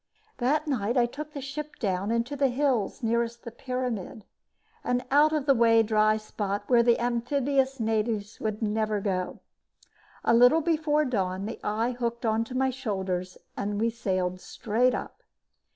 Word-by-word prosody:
That 290 +5 +1
night 240 -3 0
I 240 - +5
took 300 +5 -7
the 285 - -5
ship 295 +2 -6
down 195 -3 -1
into 235 +5 -1
the 275 -1 +2
hills 255 -4 0
nearest 235 +1 -1
the 235 - -7
pyramid, 240 -5 -4 0.6
an 250 0 0
out 295 +2 +5
of 305 -3 -1
the 275 - +5
way 230 -2 +5
dry 215 0 +3
spot 205 -2 -4
where 240 0 +4
the 235 0 +4
amphibious 265 +3 0
natives 220 -1 -1
would 220 0 -3
never 215 0 0
go. 185 -2 -3 0.8
A - - +3
little 245 +7 +6
before 305 -2 +1
dawn, 195 -6 -1
the 225 - -6
eye 220 +4 0
hooked 235 -1 -3
onto 225 +3 0
my 265 0 +2
shoulders 190 -7 -3 0.2
and 205 0 -2
we 230 +1 +1
sailed 185 -5 -2
straight 240 +3 0
up. - - -7
235 Hz, 160 wpm, -27 LUFS, 215-260 Hz, 0.8 s, little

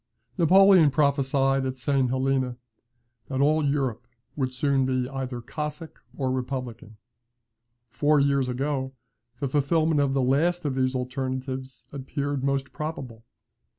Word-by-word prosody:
Napoleon 185 -1 +6
prophesied 135 -2 +2
at 130 0 -3
St. 130 +1 +1
Helena, 130 -1 0 0.7
that 130 -1 -3
all 155 +2 +3
Europe 135 -4 -1 0.3
would 130 -3 -1
soon 135 +1 +1
be 130 -1 0
either 130 -2 -5
Cossack 150 +4 -6 0.2
or 130 -2 -1
Republican. 125 -4 -5 0.9
Four 150 +3 +3
years 140 -2 +2
ago, 130 +1 -2 0.5
the 140 - -1
fulfilment 150 +3 +1
of 140 -1 0
the 135 - +2
last 165 +7 +1
of 140 - 0
these 130 0 0
alternatives 130 0 -4
appeared 140 0 -3
most 135 0 -1
probable. 135 -8 -6
135 Hz, 125 wpm, -26 LUFS, 130-145 Hz, 0.9 s, Napoleon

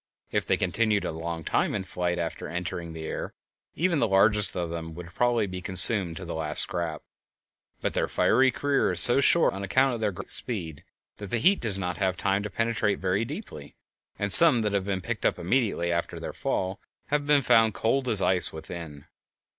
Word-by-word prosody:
If - - -2
they - - +1
continued 110 -2 -1
a - - -3
long 80 +1 -6
time - - -1
in 100 - -3
flight 90 -1 -3
after 85 -2 -5
entering 85 -1 -6
the 80 -1 -8
air, - - -6 0.4
even 170 -2 0
the 115 - +1
largest 105 0 +4
of 85 -2 -4
them 80 -1 -7
would 85 0 -11
probably 120 -3 0
be 90 -1 -7
consumed 95 -1 +3
to 95 - -8
the 85 - -6
last 75 -1 0
scrap, 85 -3 -5 0.8
but - - -2
their - - -1
fiery 130 0 +2
career 140 -1 -1
is 90 - +4
so 120 +9 +8
short 170 +3 +3
on 95 - -7
account 130 +7 +1
of 115 - -6
their 105 -2 0
great 90 - -7
speed 85 - -2 0.3
that 100 -2 -9
the 120 - -1
heat 190 - +2
does 105 -5 0
not 90 -2 -4
have 95 -2 -1
time 100 +1 -1
to 105 - -6
penetrate 115 -1 -1
very 95 +3 -1
deeply, 115 - -9 0.4
and 100 -1 +2
some 135 -9 +8
that 105 -1 -2
have 100 -2 -1
been 95 -2 -3
picked - - -5
up - - 0
immediately 95 -3 -1
after 85 0 -3
their - - -7
fall 95 +3 -3 0.3
have 145 0 -1
been 145 -2 +3
found 115 -4 +3
cold 130 +6 -1
as 105 -4 +3
ice 90 -1 +2
within. 80 -2 -10
95 Hz, 205 wpm, -25 LUFS, 85-115 Hz, 0.8 s, so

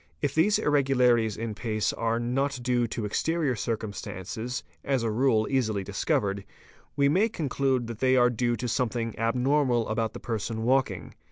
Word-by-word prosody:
| - - -38
If 145 - 0
these 180 +7 +3
irregularities 125 -6 +2
in 115 -1 -3
pace 110 -1 -1
are 115 0 -1
not 135 +3 -1
due 120 -1 +1
to 110 -1 -4
exterior 155 +5 0
circumstances, 110 +1 -4
q - - -33
as 135 -4 +2
a 115 - 0
rule 115 -1 +2
easily 110 -7 0
discovered, 100 0 -1 0.5
we 140 0 +3
may 190 +10 +3
conclude 135 - 0
that 115 -1 -7
they 130 0 +3
are 120 0 +5
due 120 0 0
to 120 +2 -4
some 125 +1 0
thing 115 -1 -3
abnormal 125 +1 +2
about 110 0 -1
the - - -7
person 110 0 -3
walking. 120 -9 0
120 Hz, 175 wpm, -27 LUFS, 110-135 Hz, 0.5 s, are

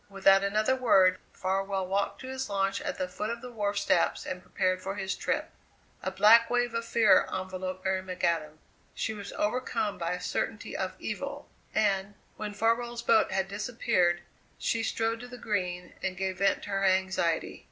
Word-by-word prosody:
Without 195 0 +5
another 215 +5 +2
word 190 -8 +4
Farwell 195 0 -1
walked 195 +2 -1
to 260 - -7
his 265 -2 -4
launch 195 +2 0
at 290 -2 -3
the 185 - -1
foot 210 +4 -4
of 235 0 -4
the 250 - -7
wharf 205 -3 -1
steps 185 -3 +2
and 185 0 -4
prepared 185 0 0
for 195 +1 -4
his 195 -1 -2
trip. - - -2 0.5
A - - -2
black 215 +5 +6
wave 245 -1 +1
of 230 0 -2
fear 220 -5 +5
enveloped 185 0 -4
Mary 190 0 +1
McAdam. 170 -4 -1 0.4
She 220 - -2
was 200 -2 -7
overcome 210 -3 -1
by 170 0 -1
a 180 - -3
certainty - - -3
of - - -2
evil, - - -5 0.3
and, 200 -1 +1 0.2
when 210 -1 -5
Farwell's 235 +2 0
boat 225 -2 +4
had 190 0 0
disappeared, 200 -4 +1 0.4
she 230 - 0
strode 225 0 -1
to 245 - -8
the 245 0 -9
Green 180 -6 -2
and 185 -1 -2
gave 190 0 -2
vent 195 -1 +2
to - - -8
her 195 0 0
anxiety. 190 -3 +1
195 Hz, 180 wpm, -29 LUFS, 185-225 Hz, 0.5 s, black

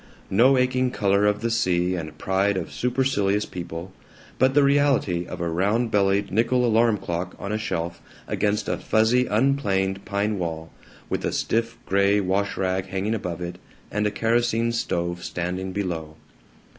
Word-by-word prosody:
No 125 +7 +5
aching 130 0 +2
color 100 -3 +2
of 105 0 +1
the 115 0 -1
sea 90 -4 +1
and 80 -4 -5
pride 95 +3 +1
of 90 - -4
supercilious 120 -5 +1
people, 85 +1 -7 0.5
but 130 +1 +3
the 145 - +6
reality 140 -11 +2
of 90 - -7
a 85 - -1
round 105 +8 +1
bellied 100 -1 +2
nickel 120 +4 +2
alarm 115 -1 +3
clock 90 0 -4
on 100 - -5
a 105 - 0
shelf 85 -5 -3 0.3
against 105 0 0
a - - -1
fuzzy 115 +3 +2
unplaned 100 -6 +1
pine 100 0 -1
wall, 80 -2 -4 0.4
with - - -2
a - - 0
stiff 115 +1 -1
gray 100 +1 +3
wash 100 +1 0
rag 95 0 -1
hanging 95 +3 -2
above 90 -6 -4
it 85 0 -5 0.3
and 105 0 0
a - - -1
kerosene 115 +1 +1
stove 85 -6 -2
standing 90 +2 -3
below. 85 -6 -4
100 Hz, 160 wpm, -24 LUFS, 90-115 Hz, 0.5 s, the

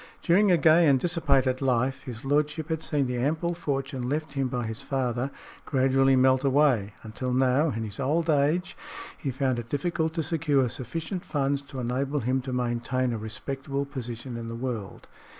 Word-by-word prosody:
During 190 +3 +4
a 175 - +5
gay 160 +2 +5
and 135 -2 +5
dissipated 140 -6 +1
life, 130 +1 +1
his 120 0 -7
lordship 150 +3 0
had 160 -1 -1
seen 145 -4 0
the 125 -1 -2
ample 160 +6 0
fortune 135 -6 -3
left 155 0 -2
him 135 -2 0
by 125 -1 -2
his 110 0 -5
father 130 -1 -1 0.3
gradually 135 -1 +3
melt 130 +1 +4
away, 135 -8 +2
until 115 +3 -4
now, 130 +4 +3
in 115 -4 -3
his 105 +1 -6
old 155 +5 +1
age, 155 +4 +1 0.4
he 140 - -4
found 130 -1 0
it 115 0 -7
difficult 160 +2 -1
to 165 - 0
secure 145 -5 +1
sufficient 160 - -5
funds 140 -1 0
to 140 -1 -9
enable 135 +4 -1
him 130 +3 0
to 130 +1 -6
maintain 125 0 -1
a 115 - -3
respectable 135 +6 -4
position 125 -3 -6
in 115 0 -6
the 115 - -5
world. 115 -5 -5
135 Hz, 180 wpm, -27 LUFS, 125-150 Hz, 0.4 s, a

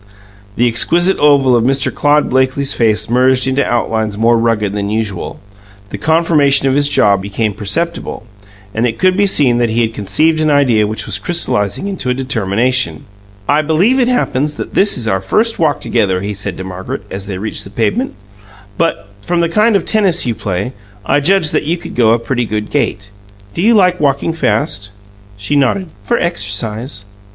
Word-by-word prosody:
The 120 - +2
exquisite 175 +11 +2
oval 140 -4 +4
of 115 - +2
Mr. 135 +2 +1
Claude 150 +1 +2
Blakely's 130 +1 0
face 110 -2 +1
merged 125 +2 +2
into 135 +1 +1
outlines 110 -3 -1
more 115 +2 +3
rugged 115 -3 0
than 100 -1 -3
usual; 105 -4 -4 0.5
the - - -6
conformation 155 -4 +3
of 135 - +2
his 145 +1 +2
jaw 100 -7 +3
became 100 +2 -3
perceptible, 110 - -3 0.5
and 115 +3 0
it 115 -1 -4
could 185 0 +2
be 200 +1 +2
seen 130 -10 +2
that 120 -1 +1
he 115 +2 0
had 115 -1 -1
conceived 155 +10 +1
an 155 - +2
idea 125 -8 +3
which 110 +1 -3
was 100 -2 -1
crystallizing 105 - -1
into 190 -10 -3
a 125 - 0
determination. 125 0 -1 0.4
"I 145 +2 +3
believe 175 - +2
it 245 - +2
happens 150 - -1
that - - -6
this 200 +1 +2
is 115 -2 -3
our 95 -3 0
first 220 - 0
walk 150 -4 +1
together," 95 -6 0
he 100 +1 -4
said 100 -2 -5
to 95 - -6
Margaret, 95 0 -6
as 95 +1 -6
they 95 -2 -5
reached 105 +3 -4
the - - -11
pavement, 160 - -1 0.6
"but, 165 -11 -1
from 175 - -1
the 170 -1 +1
kind 215 +5 +2
of 200 - +1
tennis 195 -6 +1
you 120 - 0
play, 100 +3 -4 0.3
I 145 - +2
judge 170 +1 +3
that - - -1
you 165 +4 0
could - - -9
go 115 -2 +3
a - - +3
pretty 120 +1 -2
good 105 0 -4
gait. 100 0 -2 0.4
Do - - -3
you 225 +4 +4
like 180 -3 +3
walking 140 +2 0
fast?" 120 -11 -1 0.5
She 100 +8 -2
nodded. 145 +7 +1
"For 240 - 0
exercise." 105 - -3
125 Hz, 190 wpm, -14 LUFS, 105-160 Hz, 0.6 s, oval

